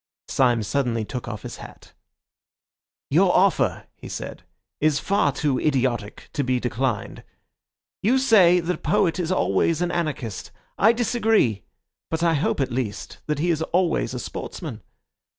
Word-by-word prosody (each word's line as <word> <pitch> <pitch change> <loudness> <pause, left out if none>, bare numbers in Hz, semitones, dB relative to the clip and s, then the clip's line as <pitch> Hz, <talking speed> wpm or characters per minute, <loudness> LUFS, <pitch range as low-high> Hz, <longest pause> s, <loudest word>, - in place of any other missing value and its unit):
Syme 120 -4 +2
suddenly 115 -2 -1
took 125 +2 -6
off 110 -3 -6
his - - -7
hat. - - -13 1.2
"Your - - +5
offer," - - +2
he - - -11
said, - - -6 0.4
"is 155 -1 +2
far 200 -5 +1
too 140 -1 0
idiotic 125 -7 -1
to 145 -3 0
be 125 -1 +1
declined. 125 -2 -2 0.8
You 240 +6 +3
say 200 -9 +5
that 175 +2 -1
a - - -26
poet 195 -4 +1
is 175 0 -1
always 160 - +1
an 175 0 0
anarchist. 140 - -3 0.3
I 220 - +5
disagree; 225 - +1 0.5
but 165 +1 -2
I 170 -1 +4
hope 145 - 0
at 130 -2 0
least 120 -5 -4
that 150 -1 0
he 170 +4 +1
is 160 -1 -1
always 175 +1 0
a - - -3
sportsman. - - -6
150 Hz, 150 wpm, -24 LUFS, 125-175 Hz, 1.2 s, Your